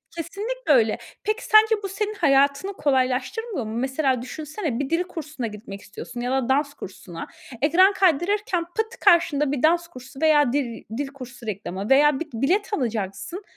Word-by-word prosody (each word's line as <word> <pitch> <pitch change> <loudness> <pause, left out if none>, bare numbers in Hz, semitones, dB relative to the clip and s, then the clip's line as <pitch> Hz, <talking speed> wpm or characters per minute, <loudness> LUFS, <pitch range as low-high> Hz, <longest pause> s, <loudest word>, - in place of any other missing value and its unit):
kesinlikle 405 +4 -2
öyle. 225 -4 +3 0.3
Peki 430 +2 -1
sence 435 +1 +6
bu 395 - -3
senin 420 +2 -2
hayatını 280 +2 +2
kolaylaştırmıyor 265 - -1
mu? 215 - -5
Mesela 265 0 0
düşünsene, 300 - -4
bir 280 0 -2
dil 335 +2 +1
kursuna 310 -8 -6
gitmek 210 -2 -9
istiyorsun 240 +3 -8
ya 250 +1 -2
da 265 -1 0
dans 285 +1 +1
kursuna. 180 -7 -9 0.3
Ekran 365 +7 +5
kaydırırken 370 - +1
pıt 440 +6 -4
karşında 295 -4 +4
bir 285 -1 -2
dans 340 +2 +3
kursu 265 -1 -12
veya 295 -5 +4
dil 245 -6 -2
dil 285 0 -2
kursu 255 -3 -11
reklamı 195 -1 -4
veya 285 +1 +5
b - - -1
bilet 360 - 0
alacaksın, 230 - -3
285 Hz, 160 wpm, -24 LUFS, 250-355 Hz, 0.3 s, sence